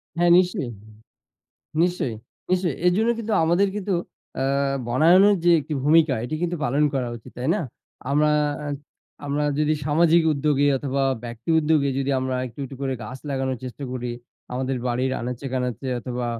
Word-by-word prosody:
হ্যাঁ, 175 0 +3
নিশ্চয়ই, 175 -9 +1 1.1
নিশ্চয়ই, 175 -9 0 0.4
নিশ্চয়ই। 180 -6 +1
এজন্য 210 +6 +3
কিন্তু 220 -1 -3
আমাদের 175 +5 +3
কিন্তু 200 -1 -2 0.4
অ্যা 140 +1 0
বনায়নের 175 +11 +5
যে 175 - +5
একটি 150 +1 -5
ভূমিকা 155 -2 +5
এটি 140 - -4
কিন্তু 175 0 -1
পালন 140 +5 +1
করা 125 -2 -1
উচিত, 115 - -14
তাই 130 +4 -2
না? - - -1 0.5
আমরা, 150 +1 +3 0.4
আ - - -3 0.6
আমরা 145 +1 0
যদি 150 0 +2
সামাজিক 165 +2 +4
উদ্যোগে 145 0 +1
অথবা 135 0 -1 0.2
ব্যক্তি 120 +6 -6
উদ্যোগে 150 -2 +2
যদি 135 +1 -1
আমরা 130 0 -2
একটু, 115 - -13
একটু 135 0 -9
করে 135 -1 -1
গাছ 130 +5 -7
লাগানোর 130 -2 -1
চেষ্টা 130 +2 -7
করি, 125 -1 -3 0.4
আমাদের 130 +1 -2
বাড়ির 125 +2 0
আনাচে 125 +3 -5
কানাচে 125 0 -2
অথবা 125 -1 -4
140 Hz, 155 wpm, -23 LUFS, 130-165 Hz, 1.1 s, বনায়নের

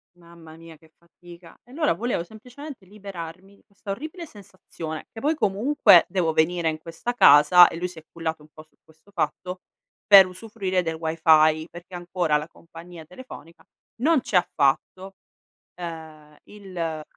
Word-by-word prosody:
Mamma 170 -2 -16
mia 165 -1 -14
che 160 +1 -24
fatica. 170 0 -17
E 245 - -21
allora 300 +2 0
volevo 210 -1 -3
semplicemente 245 - -12
liberarmi 195 -1 -10
di - - -28
questa 200 0 -9
orribile 310 - -7
sensazione, 185 - -10
che 225 - -10
poi 305 +3 0
comunque 210 - +4
devo 175 -4 -1
venire 165 +1 +1
in 155 0 -5
questa 165 +9 -6
casa- 170 -2 +7
e - - -7
lui 180 +1 -3
si 175 -2 -11
è 160 - -21
cullato 160 -2 -5
un 150 - -19
po' 155 - -14
su 155 - -36
questo 160 +5 -25
fatto- 180 +1 -4 0.5
per 200 -2 +9
usufruire 185 0 -4
del 165 -2 -4
Wi-Fi, 160 -1 +2
perché 175 +2 -14
ancora 175 -3 -1
la 150 +1 -6
compagnia 165 0 -14
telefonica 170 - -14 0.4
non 310 -1 +3
ci - - -5
ha 180 - +3
fatto, 185 +7 -1 0.7
uhm, 160 -3 -10
il 200 -3 -14
ehm, 160 -2 -3
175 Hz, 165 wpm, -23 LUFS, 160-200 Hz, 0.7 s, per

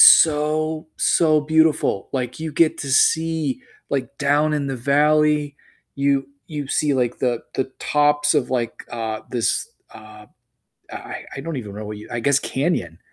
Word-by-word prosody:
so, 155 0 +5
so 155 -2 +3
beautiful. 155 -8 +2
Like, 125 -2 -3
you 160 -1 -5
get 155 +2 +2
to 140 -2 -3
see, 160 -1 +2 0.3
like, 135 -4 -2
down 145 +2 +2
in 145 -2 -1
the 135 - -3
valley, 150 +2 +2 0.4
you 140 -1 +1 0.2
you 145 -3 -5
see, 145 0 +1
like, 125 -2 0
the 120 -2 0
the 130 - 0 0.2
tops 145 0 +2
of 145 -5 +1
like, 120 -3 -2
uh, 110 -2 -4
this, 120 -3 0 0.2
uh 110 -1 -13 0.7
I - - -7
I - - -4
don't 160 +2 -5
even 105 -6 -6
know 105 +1 -6
what 105 0 -6
you 105 - -12
I 120 - -3
guess 140 +3 +3
canyon. 130 - -2
140 Hz, 160 wpm, -21 LUFS, 125-150 Hz, 0.7 s, so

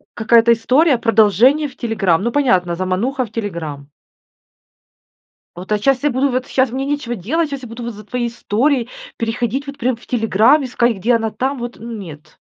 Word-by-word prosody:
какая-то 230 +1 +4
история 260 +5 +3
продолжения 230 - +3
в 265 - -15
"Телеграм". 195 -8 0
Ну, 235 - 0
понятно, 185 -12 +1
замануха 200 +9 -1
в 220 - -16
"Телеграм". 165 -10 -5 1.7
Вот 185 +4 -6
щас 270 +1 +2
я 295 - +3
буду 260 +2 +1
вот 255 +1 -2
сейчас 260 -1 +1
мне 265 +3 -3
нечего 285 -4 -2
делать, 305 - -1
сейчас 275 -2 -5
я 245 - -8
буду 235 +1 -7
за 210 -2 -11
твоей 240 +2 -2
историей 240 +2 0 0.3
переходить 240 +4 -2
вот 280 0 -8
прям 255 -2 0
в 235 - -19
"Телеграм", 225 +4 +3
искать, 240 -3 0
где 235 +6 +1
она 225 -1 -2
там, 265 +4 -2
вот. 240 0 -6
Нет. 200 -10 -9
235 Hz, 175 wpm, -18 LUFS, 215-260 Hz, 1.7 s, какая-то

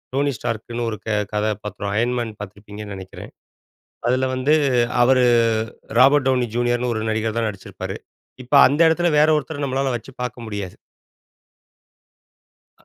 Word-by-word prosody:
டோனி 140 +1 +1
ஸ்டார்க்ன்னு 120 0 -4
ஒரு 110 - -4
க - - -5 0.2
கதா 105 +1 0
பாத்திரம். 105 -1 -5
அயன் 120 +2 +1
மேன் 115 -2 -3
பார்த்துருப்பீங்கன்னு 105 0 -9
நினைக்கிறன். 95 -1 -10 0.8
அதுல 130 +1 +2
வந்து 130 +4 +2 0.5
அவரு 130 +1 +4 0.8
ராபர்ட் 135 +1 +5
டவுனி 125 -2 +2
ஜூனியர்ன்னு 120 0 0
ஒரு 110 - -2
நடிகர் 110 0 -1
தான் 115 -1 0
நடிச்சிருப்பாரு. 100 -2 -7 0.5
இப்ப 130 - -3
அந்த 145 +4 -1
இடத்துல 175 +2 +2
வேற 150 +1 +5
ஒருத்தர 150 0 -4
நம்மளால 135 0 -1
வச்சு 120 +3 -11
பார்க்க 125 -1 -5
முடியாது. 100 -4 -5 2.0
அ - - -28
120 Hz, 140 wpm, -21 LUFS, 105-130 Hz, 2.0 s, ராபர்ட்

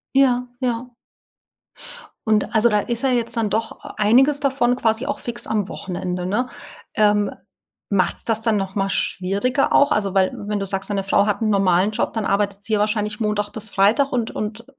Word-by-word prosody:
Ja, 250 -2 +3
ja. 245 0 -2 1.4
Und, 215 +1 +1
also, 225 +1 +4
da 210 -2 +2
ist 235 +2 -2
ja 270 - +3
jetzt 240 -2 0
dann 225 -3 0
doch 220 +2 -2 0.2
einiges 255 +7 +4
davon 265 -4 +1
quasi 230 0 0
auch 280 0 -2
fix 240 0 -5
am 210 -3 -1
Wochenende, 180 -2 -4
ne? 235 +7 -1 0.4
Ähm, 205 -1 +2 0.6
macht's 195 -3 0
das 225 -1 -1
dann 225 -1 +1
noch 195 -1 -3
mal 195 -1 0
schwieriger 200 +10 0
auch? 285 - +5
Also 200 -3 0
weil 190 -1 +3 0.2
wenn 210 -1 -1
du - - -2
sagst, 195 +1 -2
deine 200 -1 -1
Frau 195 +1 +2
hat 210 +2 -1
'n 220 - +1
normalen 195 0 +3
Job, 215 - -2
dann 220 -2 -2
arbeitet 200 0 0
sie 215 +1 0
wahrscheinlich 210 0 -1
Montag 210 -2 -1
bis 220 0 -6
Freitag 215 +9 +2
und 235 -3 -1
und 215 +2 -5
215 Hz, 185 wpm, -21 LUFS, 200-240 Hz, 1.4 s, auch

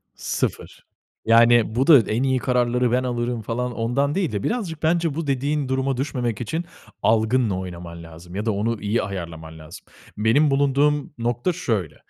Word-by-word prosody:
sıfır. - - -4 0.4
Yani, 115 0 +5
bu 130 +3 +1
da 150 -6 +9
en 115 +3 -1
iyi 130 -1 +1
kararları 125 -1 +1
ben 125 +1 +2
alırım 120 -1 -2
falan 125 +3 -3
ondan 135 +5 0
değil 185 - 0
de 100 -2 -3
birazcık 185 -11 -3
bence 165 -2 +1
bu 160 -2 -3
dediğin 140 +1 0
duruma 130 0 0
düşmemek 125 -5 -2
için 160 +8 -3 0.4
algınla 110 -1 +2
oynaman 85 -2 -8
lazım 85 +2 -12
ya 105 +2 -3
da 110 - +1
onu 110 +2 -2
iyi 105 +3 0
ayarlaman 85 -4 -7
lazım. 80 +4 -12 0.3
Benim 135 +8 +3
bulunduğum 145 +1 +1
nokta 120 +8 -1
şöyle: 105 - -2
120 Hz, 165 wpm, -23 LUFS, 105-140 Hz, 0.4 s, da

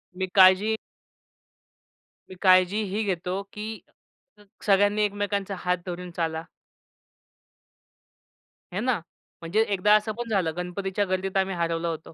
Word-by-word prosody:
मी 190 +1 -1
काळजी 190 +3 +6 1.5
मी 185 - -10
काळजी 185 +2 +5
ही 205 +2 -2
घेतो, 185 -1 -2
की 215 +1 -6 0.6
स - - -17 0.2
सगळ्यांनी 205 +1 +3
एकमेकांचा 205 -1 -2
हात 180 0 0
धरून 180 0 -6
चाला. 160 -1 -1 2.3
है 185 - -2
ना? 255 +1 +1 0.5
म्हणजे 170 +6 +1
एकदा 205 +1 +3
असं 215 +1 +1
पण 240 -1 -5
झालं 185 -7 +1
गणपतीच्या 190 +3 -2
गर्दीत 185 +1 -2
आम्ही 190 0 +1
हरवलं 170 0 -1
होतो. 160 -1 -5
190 Hz, 125 wpm, -26 LUFS, 180-205 Hz, 2.3 s, काळजी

